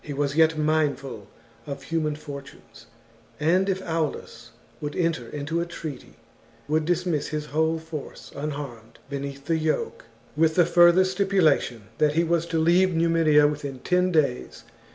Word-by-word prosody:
was 140 0 -1
yet 160 0 +4
mindful 145 -8 -1 0.4
of 140 -1 -6
human 155 0 -1
fortunes, 140 -6 -11 0.5
and, 180 +6 +2
if 190 0 -1
Aulus 160 -3 -3 0.3
would 145 -1 -4
enter 165 -9 -1
into 150 +3 -2
a - - -1
treaty, 155 -4 -8 0.5
would 155 +1 +1
dismiss 175 -2 0
his 150 0 -3
whole 160 +2 0
force 160 -3 -8
unharmed 140 -6 -6
beneath 140 0 -5
the 165 +1 +1
yoke; 155 0 -2 0.3
with 160 +1 +2
the 175 - +5
further 175 +1 +6
stipulation 185 - +1 0.2
that 150 -1 +3
he 165 +2 +2
was 170 0 0
to 165 - -1
leave 175 +3 +3
Numidia 165 -3 +4
within 145 -2 -2
ten 180 +6 +1
days. 145 - 0
155 Hz, 145 wpm, -25 LUFS, 145-170 Hz, 0.5 s, further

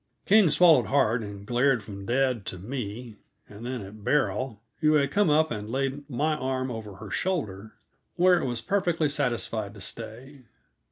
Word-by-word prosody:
King 205 -3 +6
swallowed 165 0 +5
hard 120 -4 +2
and 100 -2 -8
glared 125 0 +2
from 100 -1 -9
dad 125 -2 +1
to 95 - -4
me, 115 +1 -6 0.3
and 105 +2 -11
then 125 -4 -4
at 100 +2 -11
Beryl, 130 -5 0 0.2
who 155 0 +3
had 140 -2 +2
come 205 -4 +3
up 155 +1 +3
and 105 -1 -4
laid 135 +3 -2
my 150 +4 0
arm 130 -1 -2
over 110 -4 -7
her 105 0 -10
shoulder 110 - -2 0.4
where 180 0 +4
it - - -2
was 120 -2 -2
perfectly 175 - +1
satisfied 115 -6 -2
to 100 - -11
stay. 125 +6 -8
125 Hz, 170 wpm, -27 LUFS, 110-150 Hz, 0.4 s, King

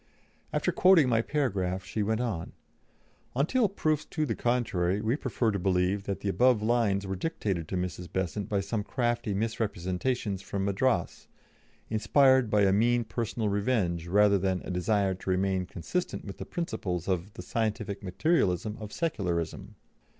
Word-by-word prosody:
After - - +1
quoting 180 -7 +5
my 115 -2 +3
paragraph 95 -10 -1
she 105 +4 -3
went 110 +3 0
on: 110 -10 -3 0.8
"Until 205 - +2
proofs 155 -6 0
to 155 -2 -2
the 115 - -1
contrary, 105 -7 0
we 110 +4 +1
prefer 125 -5 0
to 100 - -2
believe 95 +2 +1
that 100 - -3
the - - -3
above 120 +1 +3
lines 110 -4 +2
were 95 0 -3
dictated 95 - -2
to 95 - -2
Mrs. 90 -1 -4
Besant 95 +2 -2
by 100 -2 +1
some 105 +2 -2
crafty 120 -3 -1
misrepresentations 105 0 -2
from 95 0 -3
Madras, 100 -1 0 0.6
inspired 130 +3 +4
by 105 -1 +3
a 95 -1 +4
mean 120 +3 +3
personal 115 -1 -2
revenge 100 -5 0
rather 100 +2 +4
than 95 -1 -1
a - - -4
desire 95 +2 +1
to 95 +1 -7
remain 95 0 +1
consistent 140 - -3
with 100 - -8
the - - -5
principles 100 - -3
of 95 +1 -1
'the - - -7
scientific 110 -3 -2
materialism 105 - 0
of 105 -1 -7
Secularism.' 90 - -2
105 Hz, 155 wpm, -29 LUFS, 95-120 Hz, 0.8 s, quoting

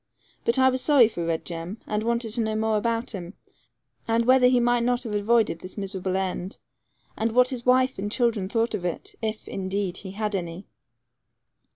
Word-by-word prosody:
But 235 - +2
I 260 0 +5
was 260 0 0
sorry 275 -6 +6
for 175 -6 -5
Red 165 -1 -2
Jem, 170 +5 -6
and 210 0 -1
wanted 235 0 -1
to 235 +2 +2
know 220 -1 -1
more 220 0 +1
about 230 +2 -1
him, 180 -3 -7 0.7
and 230 0 +2
whether 255 0 +6
he 250 0 +4
might 240 0 +2
not 245 +1 +1
have 225 -4 -5
avoided 210 -3 +2
this 185 +4 -9
miserable 190 -2 -3
end, 190 0 -3 0.6
and 225 +1 -1
what 250 +1 +5
his 250 -2 -4
wife 255 -1 +3
and 205 +1 -3
children 225 -6 0
thought 230 +1 0
of 205 -4 -3
it, 175 -2 -4
if, 220 -1 -4
indeed, 190 -1 -3
he 190 -1 -8
had 210 0 -2
any. 175 0 -4
220 Hz, 195 wpm, -25 LUFS, 190-235 Hz, 0.7 s, sorry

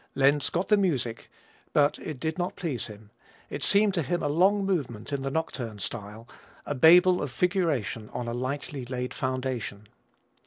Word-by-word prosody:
Lenz 140 +1 +3
got 175 +3 -2
the 210 - +6
music, 130 - -1 0.4
but 145 -1 +3
it 155 -5 -6
did 160 +4 -2
not 175 +1 -2
please 145 - -3
him 105 0 -13 0.4
it - - -4
seemed 205 0 +4
to 175 - +1
him 175 +4 -1
a - - +1
long 190 +7 +3
movement 140 - -2
in 140 - -1
the 135 - -2
nocturne 130 -8 -3
style, 105 +3 -6 0.4
a - - -2
Babel 180 +6 +6
of 145 - -2
figuration 145 - 0
on 120 - -4
a 115 - -2
lightly 130 +2 -3
laid 125 0 -4
foundation. 130 -6 -3
140 Hz, 170 wpm, -27 LUFS, 120-175 Hz, 0.4 s, the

